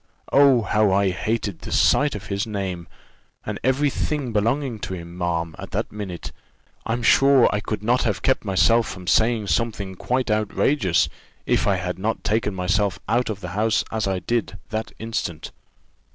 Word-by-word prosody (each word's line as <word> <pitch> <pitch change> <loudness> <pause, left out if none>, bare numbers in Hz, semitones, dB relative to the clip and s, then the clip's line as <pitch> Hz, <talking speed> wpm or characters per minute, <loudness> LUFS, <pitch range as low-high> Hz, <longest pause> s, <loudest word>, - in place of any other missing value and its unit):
Oh, 135 -4 +5
how 105 0 +2
I 95 0 +3
hated 100 +1 -2
the - - -8
sight 145 -3 +3
of 105 0 -7
his 100 +2 -2
name, 95 -5 -4 0.6
and - - -4
every 135 +3 +2
thing 140 -6 -2
belonging 115 +3 0
to 95 - -4
him, 85 0 -9
ma'am, 85 -2 -2
at - - -7
that - - -2
minute! 100 -5 -6 0.6
I'm 120 +1 -1
sure, 135 +1 +6
I 105 - +1
could 105 0 -4
not 120 +3 +2
have 105 -4 -1
kept 130 - +2
myself 115 +3 +3
from 90 -1 -8
saying 110 +3 +2
something 100 -3 -1
quite 125 +5 -1
outrageous, 105 - +2 0.4
if - - +1
I 100 - +3
had 90 0 -4
not 110 +3 -2
taken 105 -2 0
myself 95 +1 0
out 120 +1 +1
of 105 -2 -4
the 90 - -5
house, 105 +4 +1
as 110 -3 -1
I 95 -1 0
did, 115 +1 -2
that 110 0 -3
instant. 110 -8 -4
105 Hz, 175 wpm, -23 LUFS, 95-115 Hz, 0.6 s, sure